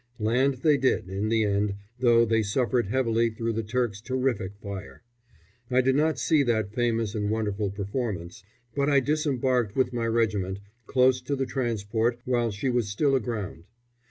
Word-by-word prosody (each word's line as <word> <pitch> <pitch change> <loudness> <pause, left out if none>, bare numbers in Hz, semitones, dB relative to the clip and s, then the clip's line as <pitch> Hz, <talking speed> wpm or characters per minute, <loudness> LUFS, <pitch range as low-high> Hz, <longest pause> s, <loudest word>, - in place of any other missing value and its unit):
Land 125 +5 +2
they 150 -2 +5
did, 130 -8 +1
in 100 +3 -2
the 110 -1 +2
end, 100 -1 0 0.2
though 120 -2 +5
they 115 0 +2
suffered 120 +2 0
heavily 115 0 +1
through 115 +1 -3
the 115 - -1
Turks' 110 -1 -2
terrific 130 -6 -1
fire. 100 -2 -8 0.7
I 130 0 +4
did 130 +1 +2
not 155 -1 +2
see 140 +5 +3
that 110 -6 0
famous 115 -3 0
and 105 -2 -1
wonderful 105 -2 -1
performance, 100 -3 -4 0.3
but 140 0 +1
I 140 -1 +5
disembarked, 130 -6 0
with 130 -2 +1
my 115 -1 -1
regiment, 105 -5 0 0.3
close 130 -1 +3
to 140 +3 -2
the 135 -1 -1
transport 120 -2 -1
while 120 -2 +1
she 105 +5 -3
was 120 -4 0
still 135 +8 +1
aground. 110 -9 -3
115 Hz, 165 wpm, -26 LUFS, 105-130 Hz, 0.7 s, they